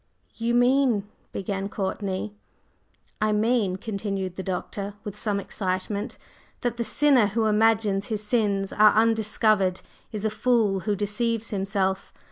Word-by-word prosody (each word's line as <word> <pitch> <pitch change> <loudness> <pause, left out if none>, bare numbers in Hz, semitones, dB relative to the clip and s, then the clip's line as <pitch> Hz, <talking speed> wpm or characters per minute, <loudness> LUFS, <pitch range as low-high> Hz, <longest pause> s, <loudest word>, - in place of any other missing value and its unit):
"You 235 +1 -1
mean 245 -4 +3
…" - - -39
began 195 0 -3
Courtney. 200 0 -3 0.9
"I 215 0 +2
mean," 210 -2 +1
continued 195 -3 -4
the 190 - -4
Doctor 195 +2 -4
with 205 -3 -6
some 210 -1 0
excitement, 195 +1 -3 0.4
"that 240 -1 -2
the 235 - 0
sinner 270 -3 +4
who 220 +2 0
imagines 215 -2 +2
his 215 -2 -2
sins 205 -3 0
are 215 0 +6
undiscovered 215 -3 +2 0.3
is 215 -1 -3
a 220 - +1
fool 215 -3 +2
who 205 - +2
deceives 225 +3 -1
himself. 195 -1 -1
210 Hz, 135 wpm, -25 LUFS, 195-225 Hz, 0.9 s, are